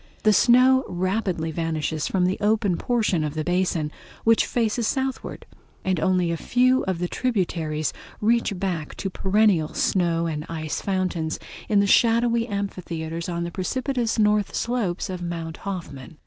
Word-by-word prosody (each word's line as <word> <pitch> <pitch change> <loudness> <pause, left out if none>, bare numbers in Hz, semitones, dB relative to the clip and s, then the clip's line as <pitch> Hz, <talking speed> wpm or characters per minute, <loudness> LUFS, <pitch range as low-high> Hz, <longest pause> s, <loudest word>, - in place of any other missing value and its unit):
The 215 - +5
snow 255 +4 +5
rapidly 185 -2 -1
vanishes 160 -1 -2
from 185 -2 +1
the 185 +1 0
open 210 -3 +2
portion 215 -7 0
of 150 0 -3
the 155 - -1
basin, 175 -3 0 0.3
which 225 0 +4
faces 230 -1 0
southward, 265 +1 -3 0.4
and 185 -3 +1
only 180 0 +2
a 165 - -1
few 255 +7 +2
of 190 -2 -1
the 175 +1 -2
tributaries 170 - -1 0.3
reach 225 -2 +1
back 175 -5 -3
to 195 - -4
perennial 190 -5 +2
snow 170 -3 +1
and 155 -2 -3
ice 155 -2 -3
fountains 185 -5 -1 0.3
in 205 -2 +4
the - - +2
shadowy 230 +2 +3
amphitheaters 170 -5 -4
on 170 -1 -2
the 170 - -4
precipitous 240 +6 -1
northern 210 -1 +2
slopes 220 -8 -1
of 185 -2 -5
Mount 165 -2 -4
Hoffman. 160 -7 -7
185 Hz, 150 wpm, -24 LUFS, 165-220 Hz, 0.4 s, The